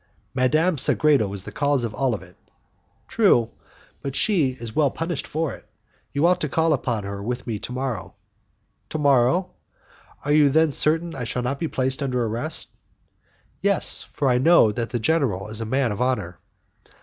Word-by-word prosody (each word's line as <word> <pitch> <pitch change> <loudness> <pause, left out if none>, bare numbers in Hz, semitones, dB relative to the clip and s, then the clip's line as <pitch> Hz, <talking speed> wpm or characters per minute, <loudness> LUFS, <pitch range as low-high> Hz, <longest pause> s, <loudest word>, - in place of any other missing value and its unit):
"Madame 155 +7 +2
Sagredo 140 -8 +3
is 100 -2 -2
the - - -8
cause 145 -3 +1
of 115 -2 -3
it - - -9
all." 130 -6 0 0.9
"True, 120 - +3 0.5
but 140 -1 -5
she 175 -11 +2
is 115 -3 -9
well 150 -3 +3
punished 165 -1 -4
for 160 -1 -2
it. - - -12 0.5
You 140 +4 +1
ought 180 0 +3
to 150 - -1
call 160 +2 +2
upon 120 -6 -2
her 100 0 -6
with 120 +4 -4
me 110 -4 -3
to - - -7
morrow." 130 -1 -4 0.7
"To - - -3
morrow? 145 +5 +3 0.7
Are 145 - 0
you 150 -1 +5
then 160 +2 +3
certain 160 +4 +2
that 140 - -8
I - - -3
shall 125 +2 -2
not 135 +3 -2
be 165 - -1
placed 130 -1 -1
under 125 -3 0
arrest?" 120 +9 -3 0.9
"Yes, - - +1
for 140 - -1
I 125 -1 +3
know 150 -6 +5
that 115 +1 -3
the 120 - -2
general 115 - 0
is 110 +1 -4
a - - -3
man 130 +1 0
of 105 - -4
honour." 125 -9 -1
135 Hz, 185 wpm, -23 LUFS, 120-155 Hz, 0.9 s, you